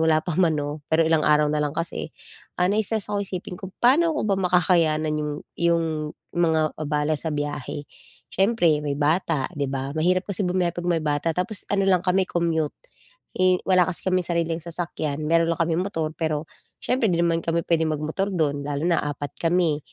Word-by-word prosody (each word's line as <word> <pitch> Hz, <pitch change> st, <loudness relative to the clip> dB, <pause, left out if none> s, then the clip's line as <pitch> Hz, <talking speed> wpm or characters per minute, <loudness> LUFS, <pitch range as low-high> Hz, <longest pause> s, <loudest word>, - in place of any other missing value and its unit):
wala 160 Hz, -1 st, +4 dB
pa 175 Hz, -, -1 dB
man 160 Hz, -4 st, +3 dB
'no, 145 Hz, +1 st, -4 dB
pero 160 Hz, +1 st, +4 dB
ilang 160 Hz, -1 st, +3 dB
araw 150 Hz, 0 st, +4 dB
na 150 Hz, -, +1 dB
lang 145 Hz, -, 0 dB
kasi, 165 Hz, 0 st, -3 dB, 0.5 s
ah, 180 Hz, -, +3 dB
nai-stress 215 Hz, 0 st, 0 dB
akong 205 Hz, 0 st, 0 dB
isipin 185 Hz, -1 st, -6 dB
kung 190 Hz, -1 st, -8 dB
paano 310 Hz, +8 st, +4 dB
ko 215 Hz, -, -1 dB
ba 200 Hz, -, +2 dB
makakayanan 165 Hz, -4 st, +2 dB
yung 150 Hz, -1 st, -2 dB, 0.3 s
yung 170 Hz, -1 st, +2 dB, 0.5 s
mga 160 Hz, -3 st, +2 dB
abala 150 Hz, 0 st, 0 dB
sa 160 Hz, -, -3 dB
biyahe? 145 Hz, -1 st, -4 dB, 0.5 s
Siyempre, 185 Hz, -7 st, +3 dB
may 145 Hz, -1 st, -1 dB
bata, 155 Hz, -1 st, +1 dB
di 140 Hz, -1 st, -1 dB
ba, 135 Hz, +1 st, -3 dB
mahirap 180 Hz, +4 st, +1 dB
kasi 200 Hz, 0 st, -2 dB
bumiyahe 180 Hz, -1 st, 0 dB
'pag 175 Hz, 0 st, -5 dB
may 165 Hz, -, +2 dB
bata. 150 Hz, +2 st, 0 dB
Tapos 200 Hz, +4 st, -2 dB
ano 195 Hz, -1 st, +2 dB
lang 180 Hz, -2 st, +3 dB
kami 185 Hz, 0 st, +2 dB
commute, 165 Hz, -3 st, 0 dB, 0.6 s
eh, 185 Hz, -1 st, +4 dB
wala 185 Hz, -2 st, +5 dB
kasi 180 Hz, -, -5 dB
kaming 185 Hz, -2 st, +1 dB
sariling 170 Hz, -1 st, 0 dB
sasakyan. 160 Hz, -3 st, -3 dB
Meron 165 Hz, +1 st, +3 dB
lang 165 Hz, -, -5 dB
kaming 165 Hz, +2 st, 0 dB
motor, 160 Hz, -6 st, -2 dB
pero 155 Hz, -2 st, -1 dB, 0.4 s
siyempre 250 Hz, -2 st, +1 dB
'di 170 Hz, -, +1 dB
naman 165 Hz, -1 st, +2 dB
kami 165 Hz, 0 st, 0 dB
puwedeng 160 Hz, -2 st, +2 dB
mag-motor 160 Hz, +7 st, -2 dB
do'n, 145 Hz, -4 st, 0 dB
lalo 145 Hz, 0 st, -2 dB
na 175 Hz, -1 st, +3 dB
4 145 Hz, -1 st, -4 dB
kami. 165 Hz, -3 st, +2 dB
165 Hz, 190 wpm, -24 LUFS, 155-180 Hz, 0.6 s, wala